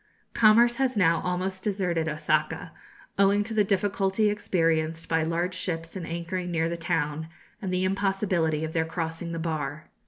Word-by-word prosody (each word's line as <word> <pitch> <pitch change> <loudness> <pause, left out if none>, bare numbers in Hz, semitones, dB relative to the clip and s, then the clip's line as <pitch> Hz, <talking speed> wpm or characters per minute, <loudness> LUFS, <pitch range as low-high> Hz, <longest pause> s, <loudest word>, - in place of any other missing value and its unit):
Commerce 235 +2 +5
has 260 -3 +1
now 165 -4 +4
almost 185 +1 -2
deserted 180 -6 0
Osaka, 155 +2 -1 0.5
owing 200 +1 +4
to 225 +2 -4
the 215 -1 +4
difficulty 200 +1 +1
experienced 165 -5 0
by 160 0 +2
large 170 +3 -1
ships 165 -2 -4
in 175 -3 -5
anchoring 170 +2 -3
near 165 -1 0
the 170 - -2
town, 160 -2 -1 0.3
and 190 -3 -3
the 185 0 0
impossibility 190 -5 0
of 160 - -6
their 160 - +2
crossing 165 0 -4
the 165 - -3
bar. 155 -2 -4
175 Hz, 160 wpm, -27 LUFS, 160-195 Hz, 0.5 s, Commerce